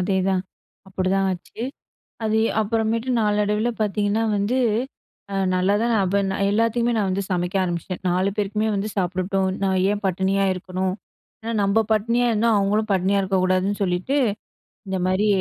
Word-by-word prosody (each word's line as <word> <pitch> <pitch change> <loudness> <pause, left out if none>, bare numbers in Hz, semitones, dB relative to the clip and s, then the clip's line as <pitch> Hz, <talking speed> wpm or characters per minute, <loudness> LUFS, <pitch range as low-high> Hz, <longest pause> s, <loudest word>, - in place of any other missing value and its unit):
அதேதான். 190 0 +1 0.5
அப்பிடிதான் 190 +1 0
ஆச்சு. 185 +5 -8 0.6
அது 220 0 +2 0.2
அப்புறமேட்டு 225 +3 0
நாளடைவுல 210 +2 +1
பாத்தீங்கன்னா 210 +1 +1
வந்து, 210 +6 0 0.7
அ - - -4 0.2
நல்லா 185 +2 +2
தான் 235 -1 +1
அப்ப 195 +2 +1
நான் 195 +1 0
எல்லாத்துக்குமே 230 +2 +1
நான் 200 -2 +1
வந்து 195 +1 -1
சமைக்க 180 +1 -1
ஆரம்பிச்சிட்டேன். 175 +1 -4
4 185 +2 +1
பேருக்குமே 210 +1 0
வந்து 200 +2 -1
சாப்பிடட்டும், 190 +1 0 0.2
"நான் 190 -1 +1
ஏன் 205 0 -2
பட்டினியா 190 +2 +1
இருக்கணும்?" 185 0 -3 0.5
ஏன்னா, 230 +1 -3
நம்ப 200 +2 +2
பட்டினியா 235 +3 +2
இருந்தா, 225 +2 +2
அவுங்களும் 210 +2 0
பட்டினியா 190 +2 +2
இருக்கக்கூடாதுன்னு 185 +1 +1
சொல்லிட்டு, 185 +9 0 0.7
இந்த 190 - -1
மாரி, 190 +3 +1
200 Hz, 140 wpm, -23 LUFS, 185-215 Hz, 0.7 s, அது